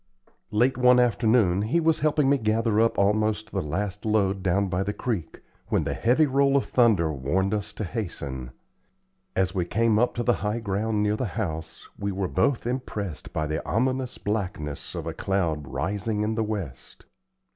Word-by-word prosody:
Late 120 +4 +2
one 125 0 +6
afternoon, 115 -5 +3
he 115 +11 +1
was 160 -1 +2
helping 150 -2 +2
me 140 0 +3
gather 110 0 +1
up 115 +1 +2
almost 105 +1 +1
the 95 - -1
last 95 +6 -3
load 100 -3 +1
down 95 +2 +1
by 90 0 -1
the 100 +1 -1
creek, 105 -10 -4 0.3
when - - +1
the - - -2
heavy 125 +7 +3
roll 140 0 +3
of 135 - 0
thunder 105 -11 +3
warned 85 +9 0
us 105 -2 -2
to - - -4
hasten. 70 - -5 0.9
As 95 0 +1
we 95 -3 0
came 110 +4 +2
up 125 - +1
to 120 - -1
the 120 - +3
high 105 +2 -1
ground 105 0 -1
near 105 0 +1
the 125 - -1
house, 80 -6 -4
we 100 0 -1
were 95 0 -2
both 105 +9 +1
impressed 105 - -4
by 75 - -1
the 75 +2 -3
ominous 130 +3 -1
blackness 90 -8 -4
of 85 -2 -4
a 80 - -3
cloud 85 -6 -1
rising 105 - -2
in 110 +1 0
the 110 0 0
west. 95 - -6
105 Hz, 180 wpm, -26 LUFS, 95-115 Hz, 0.9 s, one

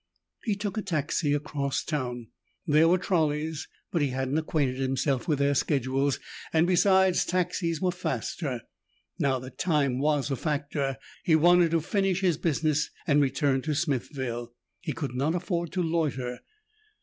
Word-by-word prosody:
Jeff 205 -2 +1
took 205 0 -3
a - - -1
taxi 155 -3 0
across 145 -2 -1
town. 125 -6 -3 0.4
There 155 0 +5
were 180 +2 +5
trolleys, 155 -4 0 0.2
but 170 - +1
he 145 - +3
hadn't 130 +3 -1
acquainted 140 -5 -1
himself 135 +2 0
with 150 -3 +2
their 140 +1 +2
schedules 135 0 +1 0.3
and, 160 +1 +4
besides, 190 0 +4
taxis 170 -2 -1
were 185 -1 +2
faster. 135 -5 -3 0.6
Now 135 -2 +2
that 130 0 -10
time 140 -7 +1
was 145 -1 +1
a - - +1
factor 140 -2 -2 0.3
he 160 - +4
wanted 175 +2 +5
to 165 0 +1
finish 195 +2 0
his 175 -5 +2
business 155 -2 +1 0.2
and 145 -1 +4
return 135 0 +1
to 150 +2 -2
Smithville 130 -5 -2 0.3
he 170 - -4
could 145 -5 -4
not 140 +6 0
afford 170 -1 -2
to 180 - 0
loiter. 145 -7 -1
150 Hz, 155 wpm, -27 LUFS, 135-170 Hz, 0.6 s, There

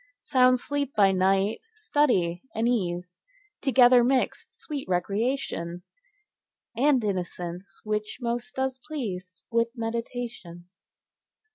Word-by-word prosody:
Sound 255 -1 +4
sleep 285 +1 -3
by 200 -2 +5
night; 195 +2 +2
study 240 - +1
and 225 +2 +1
ease 180 -6 -1 0.4
Together 250 -3 +6
mixed; 255 +1 0
sweet 290 - -5
recreation, 180 -2 -1 0.9
And 265 0 +3
innocence, 180 -2 -4
which 210 0 -2
most 240 -1 -3
does 265 0 -1
please 185 - -5
With 230 0 +3
meditation. 230 -6 -5
225 Hz, 100 wpm, -27 LUFS, 185-255 Hz, 0.9 s, Together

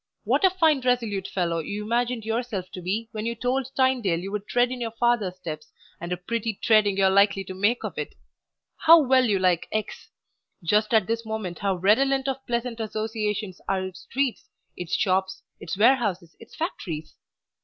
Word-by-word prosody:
What - - +1
a 380 - +7
fine 320 -6 +2
resolute 230 -6 0
fellow 170 -3 -1
you 205 +6 -4
imagined 235 +1 -1
yourself 220 -5 -3
to 185 - -7
be 210 +6 -2
when 215 +1 -4
you 235 - -2
told 250 +3 -1
Tynedale 250 -10 +2
you 195 +3 -6
would 210 0 -4
tread 245 0 +2
in 255 -1 -5
your 230 - -1
father's 225 -4 0
steps, 165 -4 -8 0.3
and 170 +1 -6
a 180 - -1
pretty 225 +3 -3
treading 210 -2 +3
you 195 - +3
are 190 - +5
likely 200 0 +4
to 185 - -8
make 205 +6 +1
of - - -5
it! - - -5 0.6
How 330 +1 +8
well 260 -3 +4
you 210 -4 +2
like 180 -3 +1
X! 215 0 -4 0.5
Just 210 +5 +2
at 220 -4 +4
this 230 +2 -2
moment 220 -6 -5
how 200 -1 0
redolent 265 +9 +2
of 270 0 -3
pleasant 235 0 -2
associations 215 -3 -3
are 190 -1 0
its 185 -1 -8
streets, 260 -5 -2 0.3
its 175 -1 -3
shops, 190 0 0 0.2
its 170 - -5
warehouses, 205 -7 +2
its - - -14
factories! 165 - -5
215 Hz, 185 wpm, -25 LUFS, 190-245 Hz, 0.6 s, How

